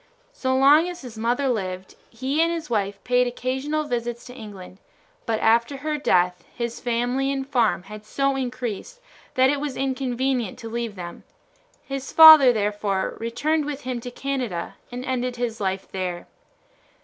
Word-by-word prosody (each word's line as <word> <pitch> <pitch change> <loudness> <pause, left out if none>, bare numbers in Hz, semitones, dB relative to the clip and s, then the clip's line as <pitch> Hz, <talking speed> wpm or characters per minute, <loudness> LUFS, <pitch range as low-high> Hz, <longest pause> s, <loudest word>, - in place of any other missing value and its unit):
So 260 -1 -1
long 290 +6 +5
as 355 0 -8
his 245 -4 -9
mother 240 +5 0
lived 190 -6 -3 0.2
he 260 +6 -1
and 335 +1 +3
his 330 -5 -5
wife 200 -2 0
paid 250 0 +2
occasional 265 +5 -2
visits 240 -4 -3
to 250 - -10
England, 200 -5 -10 0.5
but 225 -1 0
after 235 +5 +3
her 300 +2 -3
death 180 -8 +2
his 235 -1 -4
family 245 +3 0
and 270 -1 -3
farm 235 -9 +1
had 210 +2 -10
so 275 +5 0
increased 250 - -4 0.4
that 260 +1 +5
it 290 - -1
was 285 -2 -4
inconvenient 260 -3 -1
to 225 - -8
leave 230 -2 -3
them; 175 -2 -8 0.6
his 275 -1 -5
father 315 -5 +10
therefore 205 -3 -1
returned 290 +7 0
with 290 -1 -5
him 250 -2 -4
to 245 - -6
Canada 245 -9 -3 0.2
and 250 +1 -6
ended 250 -1 -2
his 235 -2 -3
life 190 0 -2
there. 180 -2 -4
245 Hz, 160 wpm, -24 LUFS, 220-270 Hz, 0.6 s, father